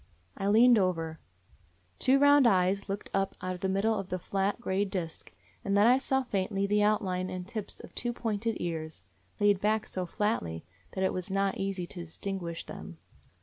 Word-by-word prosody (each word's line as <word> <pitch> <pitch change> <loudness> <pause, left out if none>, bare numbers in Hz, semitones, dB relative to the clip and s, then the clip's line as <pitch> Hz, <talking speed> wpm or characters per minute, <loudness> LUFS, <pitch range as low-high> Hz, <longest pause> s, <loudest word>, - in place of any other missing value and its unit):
I 195 - -2
leaned 230 +3 +6
over; 165 -4 -1 0.8
two 265 +1 +4
round 285 -2 +6
eyes 195 -1 +2
looked 200 +1 -4
up 195 0 0
out 185 0 -3
of 180 - -9
the 190 - 0
middle 200 +4 +2
of 195 -3 -4
the 185 - -1
flat, 195 +3 -1
gray 195 -4 0
disk, 185 -5 -5 0.3
and 200 0 +1
then 205 - +6
I 250 +3 +6
saw 265 0 +1
faintly 195 -3 -1
the 210 +1 +2
outline 190 -3 +1
and 185 -1 -5
tips 215 -1 -5
of - - -12
two 240 - -2
pointed 225 -1 -2
ears, 160 -2 -4 0.4
laid 205 -2 +3
back 215 +1 +1
so 185 -1 -4
flatly 165 - -2 0.3
that 190 - -1
it 190 - +1
was 185 0 -3
not 195 0 0
easy 195 -2 -2
to 175 - -10
distinguish 170 0 -5
them. 80 +1 -9
195 Hz, 190 wpm, -30 LUFS, 185-215 Hz, 0.8 s, leaned